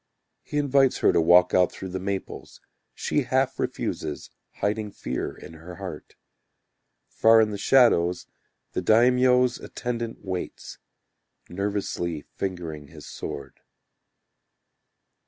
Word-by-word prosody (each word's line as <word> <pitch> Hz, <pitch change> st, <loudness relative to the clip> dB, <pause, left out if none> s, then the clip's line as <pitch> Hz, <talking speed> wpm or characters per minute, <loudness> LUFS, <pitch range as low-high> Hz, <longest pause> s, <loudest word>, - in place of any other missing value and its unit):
He 150 Hz, -, -5 dB
invites 140 Hz, -2 st, +3 dB
her -, -, +6 dB
to -, -, +4 dB
walk 90 Hz, +2 st, +5 dB
out 90 Hz, -1 st, +4 dB
through 95 Hz, -, -7 dB
the 95 Hz, +1 st, -4 dB
maples, 95 Hz, +1 st, -5 dB, 0.4 s
She -, -, 0 dB
half -, -, 0 dB
refuses, 75 Hz, -, -4 dB, 0.2 s
hiding 105 Hz, +1 st, -2 dB
fear 65 Hz, -10 st, -4 dB
in -, -, -11 dB
her 85 Hz, +3 st, -11 dB
heart. -, -, -8 dB, 0.9 s
Far 115 Hz, 0 st, +5 dB
in 110 Hz, -1 st, +3 dB
the 100 Hz, -, -4 dB
shadow 115 Hz, -8 st, +4 dB, 0.6 s
The -, -, -2 dB
daimyo's 125 Hz, +2 st, +4 dB
attendant 120 Hz, -3 st, -5 dB
waits, 95 Hz, -2 st, -6 dB, 0.7 s
Nervously 90 Hz, -4 st, -3 dB
fingering 85 Hz, -6 st, -5 dB
his 75 Hz, 0 st, -13 dB
sword. 70 Hz, -1 st, -7 dB
100 Hz, 115 wpm, -25 LUFS, 85-120 Hz, 0.9 s, her